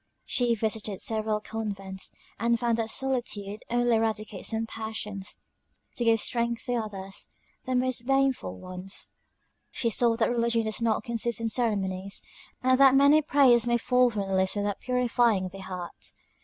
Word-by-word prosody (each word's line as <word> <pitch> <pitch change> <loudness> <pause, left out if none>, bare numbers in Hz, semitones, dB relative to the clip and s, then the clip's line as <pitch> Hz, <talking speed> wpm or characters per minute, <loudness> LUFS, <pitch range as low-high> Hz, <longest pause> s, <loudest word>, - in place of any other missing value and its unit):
She 240 -2 +1
visited 215 -2 -1
several 215 -1 0
convents, 195 -4 -5 0.3
and 235 +1 +1
found 235 -1 0
that 225 -1 -1
solitude 220 -6 -1
only 240 -1 +2
eradicates 215 -3 -1
some 225 0 -1
passions, 215 -3 -5 0.6
to 240 - -2
give 225 -1 +4
strength 235 +1 0
to 245 - -1
others; 195 -4 -3 0.4
the 255 0 -1
most 250 -1 +1
baneful 270 - +1
ones. 185 - -6 0.6
She 230 - -1
saw 230 +1 +4
that 225 -1 +1
religion 235 -1 +1
does 220 +1 -2
not 225 -2 +1
consist 235 0 +1
in 230 0 -1
ceremonies; 200 -4 0 0.4
and 255 0 +3
that 270 -1 +7
many 285 +3 +6
prayers 260 -5 +4
may 240 0 +3
fall 250 +1 +3
from 205 -4 -3
the 195 - -3
lips 190 +1 +1
without 205 -1 -2
purifying 240 -6 +1
the 195 +2 -11
heart. 185 -2 -7
225 Hz, 155 wpm, -27 LUFS, 205-240 Hz, 0.6 s, that